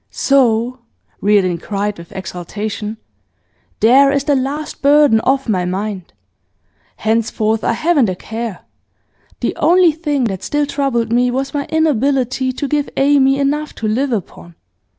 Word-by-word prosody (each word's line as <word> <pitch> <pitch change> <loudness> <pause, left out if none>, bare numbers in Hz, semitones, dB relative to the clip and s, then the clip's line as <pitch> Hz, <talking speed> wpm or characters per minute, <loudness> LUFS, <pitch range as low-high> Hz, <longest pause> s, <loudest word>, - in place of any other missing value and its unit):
'So,' 250 -2 +1 0.4
Reardon 195 -4 +2
cried 205 +1 -3
with 170 - -12
exultation, 205 +4 -5 0.8
'there 270 +5 +6
is 280 -1 0
the 285 -1 +1
last 280 +3 -3
burden 285 -4 +5
off 270 +2 0
my 190 -5 0
mind! 190 0 -4 0.8
Henceforth 220 0 0
I - - +1
haven't 290 - +2
a 185 - -2
care! 225 +1 -6 0.8
The - - -1
only 350 0 +4
thing 295 -4 -2
that 195 -6 -2
still 295 0 -1
troubled 270 -6 -1
me 245 +1 +3
was 270 +2 -3
my 285 -1 -2
inability 270 -4 0
to 280 +3 -4
give 290 +1 -1
Amy 275 -1 +3
enough 290 +2 -1
to 220 - -3
live 255 +6 0
upon. 175 -5 -5
255 Hz, 140 wpm, -17 LUFS, 215-280 Hz, 0.8 s, there